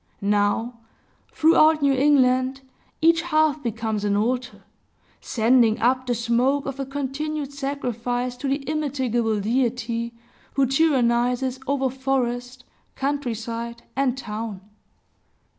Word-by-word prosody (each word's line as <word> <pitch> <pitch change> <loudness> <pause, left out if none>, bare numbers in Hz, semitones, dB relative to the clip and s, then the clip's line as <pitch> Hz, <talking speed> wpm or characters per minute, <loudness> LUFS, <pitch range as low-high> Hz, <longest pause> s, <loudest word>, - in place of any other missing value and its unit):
Now, 215 +4 0 0.5
throughout 315 -1 +4
New 280 -1 +4
England, 260 -1 +3 0.4
each 330 0 +5
hearth 310 -3 +1
becomes 220 -3 -2
an 205 -1 +1
altar, 245 +3 -2 0.6
sending 230 -1 +3
up 255 +2 +1
the 245 - +1
smoke 245 +5 +1
of 275 0 -5
a 270 - -3
continued 285 +1 -4
sacrifice 250 -3 -3
to 280 - -4
the 275 0 -2
immitigable 260 -7 0
deity 235 +1 -1 0.4
who 275 - +3
tyrannizes 255 -3 +1
over 270 -2 0
forest, 250 -1 -2 0.3
country 275 -3 -1
side, 230 +1 -6
and 265 -1 +1
town. 215 -4 -5
255 Hz, 110 wpm, -23 LUFS, 235-275 Hz, 0.6 s, each